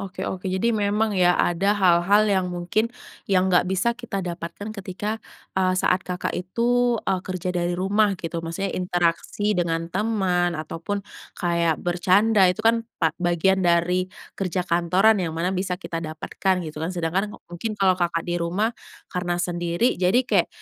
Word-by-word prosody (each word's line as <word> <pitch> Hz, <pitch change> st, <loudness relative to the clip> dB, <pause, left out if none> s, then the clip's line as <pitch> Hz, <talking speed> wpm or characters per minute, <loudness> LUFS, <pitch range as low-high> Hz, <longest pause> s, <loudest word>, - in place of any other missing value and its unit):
oke 195 Hz, -1 st, -5 dB
oke, 190 Hz, 0 st, -4 dB
jadi 190 Hz, +6 st, +1 dB
memang 210 Hz, +1 st, +1 dB
ya, 180 Hz, -2 st, +3 dB
ada 195 Hz, +4 st, +2 dB
hal-hal 190 Hz, +2 st, +4 dB
yang 195 Hz, -3 st, +1 dB
mungkin 180 Hz, +6 st, -1 dB, 0.4 s
yang 190 Hz, -1 st, +2 dB
nggak 180 Hz, 0 st, +4 dB
bisa 190 Hz, +5 st, +1 dB
kita 235 Hz, -6 st, -5 dB
dapatkan 175 Hz, +4 st, -6 dB
ketika, 205 Hz, +4 st, -4 dB, 0.3 s
eee, 185 Hz, -1 st, +1 dB
saat 185 Hz, 0 st, +2 dB
Kakak 180 Hz, -1 st, -4 dB
itu, 240 Hz, +6 st, +1 dB
eee, 190 Hz, -1 st, 0 dB
kerja 185 Hz, -1 st, -4 dB
dari 175 Hz, 0 st, -1 dB
rumah, 200 Hz, +2 st, +2 dB
gitu. 165 Hz, 0 st, -4 dB
Maksudnya 165 Hz, +4 st, -3 dB
interaksi 180 Hz, +3 st, 0 dB
dengan 165 Hz, -2 st, -1 dB
teman, 185 Hz, -5 st, +1 dB
ataupun 165 Hz, +6 st, -4 dB, 0.3 s
kayak 170 Hz, -3 st, +1 dB
bercanda, 190 Hz, +3 st, +4 dB
itu 220 Hz, +5 st, -2 dB
kan 230 Hz, +1 st, +4 dB, 0.2 s
pa 160 Hz, -2 st, +1 dB
bagian 175 Hz, +2 st, +2 dB
dari 180 Hz, +1 st, +2 dB, 0.2 s
kerja 185 Hz, -1 st, -2 dB
kantoran 180 Hz, +5 st, +3 dB
yang 165 Hz, -3 st, -3 dB
mana 180 Hz, +3 st, 0 dB
bisa 185 Hz, -1 st, -2 dB
kita 170 Hz, -2 st, -5 dB
dapatkan, 170 Hz, +3 st, -2 dB
gitu 155 Hz, -1 st, -7 dB
kan. 160 Hz, -, -2 dB
Sedangkan 180 Hz, +5 st, -1 dB
mungkin 210 Hz, +6 st, -5 dB
kalau 195 Hz, -2 st, +4 dB
Kakak 175 Hz, -2 st, -1 dB
di 175 Hz, 0 st, -2 dB
rumah, 195 Hz, +7 st, 0 dB, 0.4 s
karena 180 Hz, -1 st, -1 dB
sendiri, 175 Hz, +4 st, 0 dB
jadi 185 Hz, +4 st, +3 dB
kayak, 200 Hz, -8 st, +2 dB
185 Hz, 160 wpm, -24 LUFS, 175-200 Hz, 0.4 s, hal-hal